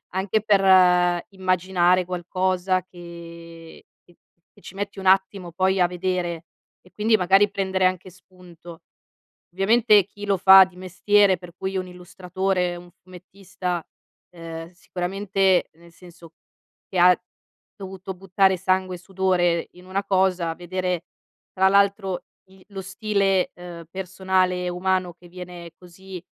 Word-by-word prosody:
anche 195 Hz, +2 st, 0 dB
per 205 Hz, -2 st, +2 dB, 0.7 s
immaginare 185 Hz, -1 st, +1 dB
qualcosa 185 Hz, +1 st, -1 dB
che 170 Hz, -2 st, -12 dB, 0.2 s
che 175 Hz, -, -23 dB, 0.4 s
che -, -, -21 dB
ci 190 Hz, -, -12 dB
metti 200 Hz, 0 st, -5 dB
un 190 Hz, -, -8 dB
attimo 190 Hz, -2 st, +2 dB
poi 190 Hz, +2 st, +1 dB
a 175 Hz, -, +4 dB
vedere, 175 Hz, -2 st, -3 dB, 0.4 s
e 185 Hz, -, -23 dB
quindi 220 Hz, +1 st, +2 dB
magari 195 Hz, +3 st, +3 dB
prendere 190 Hz, -2 st, -1 dB
anche 185 Hz, 0 st, -1 dB
spunto. 175 Hz, -2 st, -15 dB, 0.7 s
Ovviamente 210 Hz, +1 st, +4 dB
chi 205 Hz, +1 st, -11 dB
lo 200 Hz, -, +1 dB
fa 190 Hz, +1 st, +8 dB
di 185 Hz, -1 st, -15 dB
mestiere, 190 Hz, +1 st, +2 dB
per 180 Hz, -1 st, -13 dB
cui 190 Hz, 0 st, -4 dB
un 185 Hz, -, -3 dB
illustratore, 180 Hz, 0 st, -3 dB
un 175 Hz, 0 st, -13 dB
fumettista, 185 Hz, -1 st, -7 dB, 0.5 s
ehm, 165 Hz, -1 st, -9 dB
sicuramente 190 Hz, +1 st, -1 dB
nel 170 Hz, +1 st, -19 dB
senso 170 Hz, -2 st, -16 dB, 0.6 s
che 185 Hz, -, -4 dB
ha 180 Hz, +1 st, +5 dB, 0.6 s
dovuto 190 Hz, -1 st, -8 dB
buttare 190 Hz, +1 st, +1 dB
sangue 185 Hz, 0 st, -1 dB
e -, -, -13 dB
sudore 180 Hz, -2 st, 0 dB
in 180 Hz, +1 st, -17 dB
una 190 Hz, +2 st, -2 dB
cosa, 185 Hz, -4 st, 0 dB
vedere 180 Hz, 0 st, -3 dB, 0.5 s
tra 190 Hz, 0 st, +3 dB
l'altro 200 Hz, -1 st, +1 dB, 0.2 s
i 190 Hz, 0 st, -20 dB
lo 195 Hz, -2 st, -7 dB
stile, 195 Hz, -1 st, 0 dB
uhm, 175 Hz, -1 st, -10 dB
personale 185 Hz, -1 st, -1 dB
e -, -, -1 dB
umano 185 Hz, 0 st, -1 dB
che 175 Hz, +1 st, -18 dB
viene 175 Hz, -1 st, -10 dB
così, 185 Hz, 0 st, -12 dB
185 Hz, 135 wpm, -23 LUFS, 175-190 Hz, 0.7 s, fa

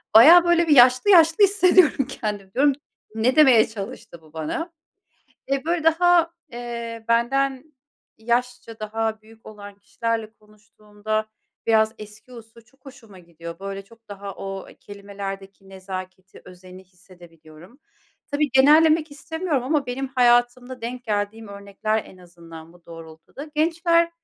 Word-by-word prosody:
Bayağı 330 Hz, +10 st, +9 dB
böyle 345 Hz, -1 st, +2 dB
bir 300 Hz, -, +4 dB
yaşlı 255 Hz, +8 st, +5 dB
yaşlı 330 Hz, 0 st, +5 dB
hissediyorum 365 Hz, -7 st, +3 dB
kendimi. 210 Hz, -7 st, -6 dB
Diyorum 280 Hz, +2 st, +3 dB
ki, 270 Hz, -, -18 dB, 0.4 s
"Ne 235 Hz, +4 st, +1 dB
demeye 265 Hz, -8 st, +5 dB
çalıştı 200 Hz, -3 st, -10 dB
bu 155 Hz, -1 st, -22 dB
bana?" 320 Hz, -, -5 dB, 0.8 s
Eee, 275 Hz, 0 st, -2 dB
böyle, 335 Hz, 0 st, -2 dB
daha, 335 Hz, +1 st, +3 dB, 0.2 s
eee, 235 Hz, -1 st, -7 dB
benden 270 Hz, +5 st, -1 dB, 0.4 s
yaşça 240 Hz, 0 st, -3 dB
daha 220 Hz, 0 st, -3 dB
büyük 225 Hz, +1 st, -20 dB
olan 205 Hz, -1 st, -12 dB
kişilerle 225 Hz, +1 st, -4 dB
konuştuğumda 215 Hz, 0 st, -7 dB, 0.4 s
biraz 220 Hz, -1 st, +2 dB
eski 215 Hz, +3 st, -14 dB
usul 230 Hz, -1 st, -14 dB
çok 255 Hz, +4 st, -31 dB
hoşuma 230 Hz, -7 st, -15 dB
gidiyor. 170 Hz, -1 st, -11 dB
Böyle, 195 Hz, 0 st, -7 dB
çok 230 Hz, +2 st, -22 dB
daha 200 Hz, -1 st, -8 dB
o 195 Hz, -1 st, -8 dB
kelimelerdeki 195 Hz, -1 st, -9 dB
nezaketi, 185 Hz, 0 st, -10 dB
özeni 185 Hz, +1 st, -14 dB
hissedebiliyorum. 175 Hz, -, -18 dB, 0.5 s
Tabii, 290 Hz, 0 st, 0 dB
genellemek 310 Hz, +4 st, +4 dB
istemiyorum 305 Hz, 0 st, -4 dB
ama 285 Hz, +2 st, -1 dB
benim 260 Hz, +2 st, -4 dB
hayatımda 245 Hz, 0 st, +1 dB
denk 245 Hz, +1 st, -6 dB
geldiğim 210 Hz, 0 st, -4 dB
örnekler, 200 Hz, +2 st, -4 dB
en 185 Hz, -, -16 dB
azından, 170 Hz, -2 st, -14 dB
bu 175 Hz, -1 st, -23 dB
doğrultuda. 165 Hz, -, -12 dB
Gençler, 335 Hz, +2 st, +1 dB
225 Hz, 130 wpm, -22 LUFS, 195-275 Hz, 0.8 s, Bayağı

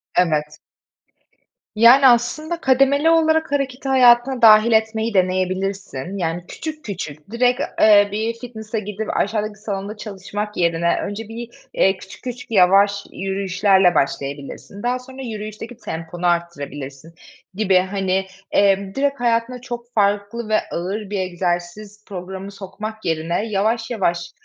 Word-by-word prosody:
Evet. 150 Hz, -3 st, +1 dB, 1.2 s
Yani, 240 Hz, +5 st, +7 dB
aslında 305 Hz, +8 st, +1 dB
kademeli 275 Hz, +4 st, +3 dB
olarak 320 Hz, -1 st, +3 dB
hareketi 275 Hz, -1 st, -2 dB
hayatına 250 Hz, 0 st, +5 dB
dâhil 220 Hz, 0 st, +7 dB
etmeyi 220 Hz, 0 st, +1 dB
deneyebilirsin. 185 Hz, -2 st, -1 dB
Yani, 170 Hz, -1 st, -3 dB
küçük, 310 Hz, -1 st, -7 dB
küçük, 160 Hz, -3 st, -7 dB
direkt, 245 Hz, +1 st, +2 dB, 0.2 s
eee, 205 Hz, -1 st, +6 dB
bir 220 Hz, +3 st, -1 dB
fitness'a 225 Hz, -2 st, -6 dB
gidip, 210 Hz, +1 st, -4 dB
aşağıdaki 210 Hz, 0 st, -1 dB
salonda 205 Hz, 0 st, -5 dB
çalışmak 210 Hz, 0 st, -6 dB
yerine 170 Hz, 0 st, +2 dB
önce 205 Hz, +2 st, -5 dB
bir, 230 Hz, +1 st, -7 dB, 0.2 s
eee, 190 Hz, 0 st, +3 dB
küçük, 190 Hz, -, -13 dB
küçük, 250 Hz, -1 st, -7 dB
yavaş 200 Hz, +1 st, +4 dB
yürüyüşlerle 190 Hz, -1 st, +2 dB
başlayabilirsin. 140 Hz, +7 st, -3 dB
Daha 250 Hz, +1 st, 0 dB
sonra 260 Hz, +1 st, -11 dB
yürüyüşteki 215 Hz, 0 st, -7 dB
temponu 170 Hz, -3 st, -4 dB
arttırabilirsin 145 Hz, -3 st, -3 dB, 0.4 s
gibi. 195 Hz, -1 st, +2 dB
Hani, 190 Hz, 0 st, -1 dB, 0.3 s
eee, 195 Hz, -1 st, +3 dB
direkt 280 Hz, 0 st, 0 dB
hayatına 240 Hz, +1 st, 0 dB
çok 240 Hz, -1 st, -7 dB
farklı 205 Hz, +2 st, 0 dB
ve 215 Hz, -, +4 dB
ağır 195 Hz, +4 st, -4 dB
bir 205 Hz, -1 st, -2 dB
egzersiz 185 Hz, +3 st, -3 dB
programı 190 Hz, 0 st, -7 dB
sokmak 210 Hz, +3 st, -8 dB
yerine 165 Hz, +5 st, -1 dB
yavaş, 220 Hz, +3 st, 0 dB
yavaş, 175 Hz, -7 st, -1 dB
205 Hz, 125 wpm, -20 LUFS, 185-235 Hz, 1.2 s, Yani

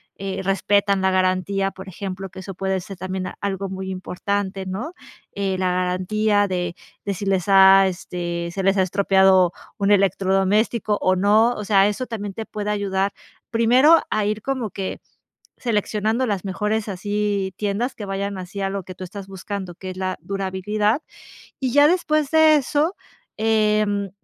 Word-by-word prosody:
eh, 195 Hz, 0 st, -4 dB
respetan 200 Hz, 0 st, +2 dB
la 190 Hz, 0 st, +2 dB
garantía, 185 Hz, +1 st, +1 dB
por 190 Hz, 0 st, -11 dB
ejemplo, 190 Hz, +1 st, -6 dB
que 190 Hz, -, -11 dB
eso 190 Hz, 0 st, -8 dB
puede 190 Hz, 0 st, -1 dB
ser 195 Hz, +1 st, -9 dB
también 185 Hz, +1 st, -4 dB
algo 195 Hz, -1 st, -3 dB
muy 190 Hz, 0 st, -5 dB
importante, 190 Hz, +1 st, -3 dB
¿no?, 210 Hz, -, -5 dB, 0.4 s
eh, 195 Hz, -1 st, -1 dB
la 185 Hz, -1 st, +1 dB
garantía 200 Hz, +3 st, +1 dB
de 180 Hz, -2 st, -2 dB, 0.3 s
de 200 Hz, -, -1 dB
si 200 Hz, +2 st, -5 dB
les 190 Hz, -2 st, +2 dB
ha, 195 Hz, 0 st, +8 dB
este, 175 Hz, -2 st, -4 dB
se 195 Hz, +2 st, -3 dB
les 195 Hz, +1 st, +3 dB
ha -, -, +4 dB
estropeado 190 Hz, -1 st, +4 dB, 0.3 s
un 200 Hz, 0 st, +1 dB
electrodoméstico, 200 Hz, +3 st, +2 dB
o 185 Hz, -, +3 dB
no. 210 Hz, +5 st, +4 dB
O 210 Hz, -, -6 dB
sea, 195 Hz, -1 st, +4 dB
eso 210 Hz, +5 st, -3 dB
también 205 Hz, -4 st, -5 dB
te 220 Hz, +2 st, -6 dB
puede 210 Hz, 0 st, -3 dB
ayudar 200 Hz, -1 st, -1 dB, 0.4 s
primero 250 Hz, +8 st, +5 dB
a 215 Hz, -1 st, 0 dB
ir 215 Hz, +1 st, -1 dB
como 255 Hz, -4 st, -3 dB
que 190 Hz, +1 st, -5 dB, 0.6 s
seleccionando 220 Hz, +1 st, 0 dB
las 205 Hz, -6 st, -2 dB
mejores 210 Hz, +3 st, -1 dB
así 200 Hz, 0 st, -2 dB
tiendas 210 Hz, +5 st, -2 dB
que 210 Hz, -, -6 dB
vayan 195 Hz, 0 st, -3 dB
así 185 Hz, +2 st, -7 dB
a 195 Hz, -, 0 dB
lo 195 Hz, -1 st, -4 dB
que 185 Hz, +1 st, -10 dB
tú 185 Hz, -, -8 dB
estás 195 Hz, +1 st, -9 dB
buscando, 190 Hz, -1 st, -6 dB
que 185 Hz, +1 st, -7 dB
es 185 Hz, -, -10 dB
la 185 Hz, 0 st, -2 dB
durabilidad. 200 Hz, +5 st, -1 dB, 0.6 s
Y 260 Hz, -2 st, -1 dB
ya 290 Hz, +2 st, +6 dB
después 310 Hz, -4 st, +1 dB
de 315 Hz, -1 st, +6 dB
eso, 295 Hz, +5 st, +1 dB, 0.4 s
em, 210 Hz, -2 st, +1 dB
195 Hz, 170 wpm, -22 LUFS, 190-210 Hz, 0.6 s, ha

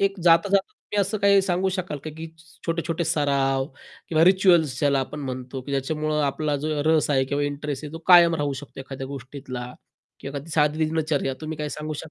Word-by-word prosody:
एक 195 Hz, 0 st, +1 dB
जाता-जाता 190 Hz, +4 st, +4 dB
तुम्ही 210 Hz, -, -6 dB
असं 200 Hz, +2 st, -1 dB
काही 200 Hz, 0 st, +6 dB
सांगू 185 Hz, 0 st, 0 dB
शकाल 180 Hz, -6 st, -4 dB
का, 155 Hz, -, -4 dB
की 160 Hz, +1 st, -6 dB, 0.4 s
छोटे-छोटे 165 Hz, 0 st, -1 dB
सराव 140 Hz, -4 st, +1 dB, 0.4 s
किंवा 160 Hz, 0 st, +4 dB
रिच्युअल्स 175 Hz, -7 st, +4 dB
ज्याला 140 Hz, -2 st, +2 dB
आपण 145 Hz, +3 st, -5 dB
म्हणतो, 130 Hz, 0 st, -5 dB
की 135 Hz, +2 st, -9 dB
ज्याच्यामुळं 150 Hz, +2 st, -1 dB
आपला 145 Hz, +1 st, -1 dB
जो 155 Hz, -2 st, -1 dB
रस 160 Hz, -1 st, +3 dB
आहे 135 Hz, -2 st, +3 dB
किंवा 145 Hz, 0 st, 0 dB
इंटरेस्ट 145 Hz, 0 st, -4 dB
आहे 150 Hz, -, -7 dB
तो 165 Hz, -, -6 dB
कायम 170 Hz, -2 st, +8 dB
राहू 145 Hz, -, -1 dB
शकतो 140 Hz, -1 st, -11 dB
एखाद्या 135 Hz, 0 st, -7 dB
गोष्टीतला 130 Hz, -2 st, -7 dB, 0.6 s
किंवा 140 Hz, +1 st, -6 dB
एखादी 145 Hz, +4 st, -7 dB
साधी 155 Hz, 0 st, +2 dB
दिनचर्या 155 Hz, -4 st, -1 dB
तुम्ही 155 Hz, 0 st, -5 dB
काय 150 Hz, 0 st, -2 dB
सांगू 155 Hz, 0 st, -4 dB
शक -, -, -5 dB
150 Hz, 195 wpm, -24 LUFS, 140-165 Hz, 0.6 s, कायम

